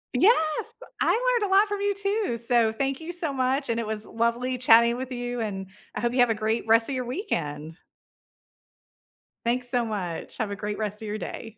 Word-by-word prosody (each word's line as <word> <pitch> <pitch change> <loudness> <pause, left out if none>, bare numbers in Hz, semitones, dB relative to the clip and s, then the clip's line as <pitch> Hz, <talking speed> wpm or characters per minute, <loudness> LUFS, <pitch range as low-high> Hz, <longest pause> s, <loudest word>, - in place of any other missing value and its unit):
Yes, 315 - +3 0.2
I - - +2 0.3
learned 410 -3 -2
a 385 - +4
lot 410 +2 +6
from 410 -1 -3
you 405 -1 0
too, 400 - -1
so, 230 -1 +3
thank 270 +5 -2
you 330 +2 -5
so 335 -5 0
much, 265 +1 0
and 230 0 0
it 225 - -3
was 215 0 -2
lovely 235 +2 -1
chatting 235 -1 +6
with 260 +1 -6
you, 245 -1 -3
and 195 -3 -4 0.3
I - - -3
hope 240 0 0
you 250 - 0
have 245 -1 +5
a 225 - +1
great 220 +1 -1
rest 225 0 +6
of 280 - -3
your 255 -1 -2
weekend. 160 - -4 1.7
Thanks 245 +1 +1
so 245 -2 +2
much, 190 -6 -5
have 215 -2 -2
a 200 - -3
great 210 0 -4
rest 210 0 -3
of 220 - -6
your 210 +1 -3
day. 225 0 -7
240 Hz, 215 wpm, -26 LUFS, 220-275 Hz, 1.7 s, lot